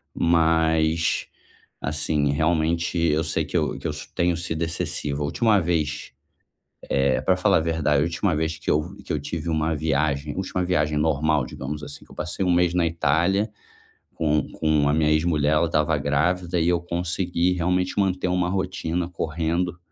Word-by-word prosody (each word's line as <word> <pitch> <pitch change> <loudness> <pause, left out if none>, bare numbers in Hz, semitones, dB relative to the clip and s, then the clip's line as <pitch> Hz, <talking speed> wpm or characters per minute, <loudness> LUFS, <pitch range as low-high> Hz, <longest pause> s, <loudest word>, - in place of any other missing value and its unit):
Mas, 80 -1 +2 0.5
assim, 75 0 0
realmente, 85 +2 +1
eu 80 -1 +2
sei 80 - 0
que - - -3
eu - - 0
que - - -4
eu - - -2 0.2
tenho 85 -1 +1
sido 85 -1 -3
excessivo, 75 -3 -2
a - - -1
última 110 +6 +2
vez 80 -4 -2 0.8
eh, 65 -1 +2
pra - - +2
falar - - +3
a - - +3
verdade, 80 -3 +1
eu 85 - -1
tive 85 +5 -1
uma 85 - +2
vez 80 +1 -1
que 80 - -5
eu 75 +1 0
que - - -3
eu 75 - 0
tive 80 +3 -5
uma 80 0 0
viagem 75 -1 -1
última 95 -1 -2
viagem 75 -4 +1
normal, 75 -2 +1
digamos 70 +4 -6
assim, 70 0 -9
que - - -20
eu - - -13
passei - - -3
1 90 - +2
mês 85 0 +3
na 90 -1 +2
Itália 85 +6 +1 0.7
com 75 -3 0
com 75 -2 +1
a - - +2
minha 80 -1 +2
ex-mulher, 75 -1 +2
ela 80 +2 +3
estava 75 0 +1
grávida, 85 +6 0
e 80 - +1
eu 90 -1 +2
consegui, 90 +1 -1
realmente, 90 +2 0
manter 95 -2 0
uma 90 -1 +1
rotina 90 -2 -2
correndo. 85 +1 -2
80 Hz, 180 wpm, -24 LUFS, 75-85 Hz, 0.8 s, falar